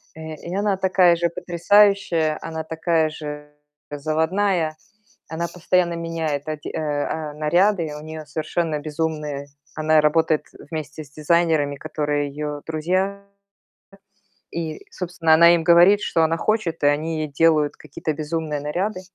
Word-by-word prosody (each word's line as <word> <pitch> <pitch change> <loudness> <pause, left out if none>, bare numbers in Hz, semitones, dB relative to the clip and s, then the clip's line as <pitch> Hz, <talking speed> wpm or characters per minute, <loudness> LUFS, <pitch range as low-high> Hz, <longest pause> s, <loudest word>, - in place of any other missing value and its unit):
э, 160 0 -7
и 170 +4 -7
она 200 -1 +1
такая 185 -2 +4
же 170 0 +1
потрясающая, 175 -2 +2
она 160 -1 -5
такая 160 0 0
же 150 -1 -7 0.4
заводная. 160 +3 0 0.5
Она 170 +1 -3
постоянно 180 0 +1
меняет 160 -3 -3
оде 155 -1 -5
э, - - -4
а, 150 0 -2
наряды. 170 +4 +2
И 150 - -6
у 150 - -8
неё 155 0 -8
совершенно 155 +2 -2
безумные. 150 -2 -3 0.3
Она 155 0 +3
работает 155 0 +2 0.3
вместе 155 -1 -5
с 140 - -19
дизайнерами, 155 -2 +1
которые 145 -1 -2
её 150 +1 -5
друзья. 185 +5 -1 1.3
И, 160 -2 -5
собственно, 175 -3 0
она 170 +2 +7
им 165 - -1
говорит, 175 +5 +6
что 165 - +1
она 165 +1 +1
хочет, 180 -8 -1
и 145 - +5
они 155 +2 0
ей 155 - -2
делают 150 0 +2
какие-то 155 +1 -5
безумные 155 -1 -3
наряды. 185 +7 -2
160 Hz, 140 wpm, -22 LUFS, 150-170 Hz, 1.3 s, она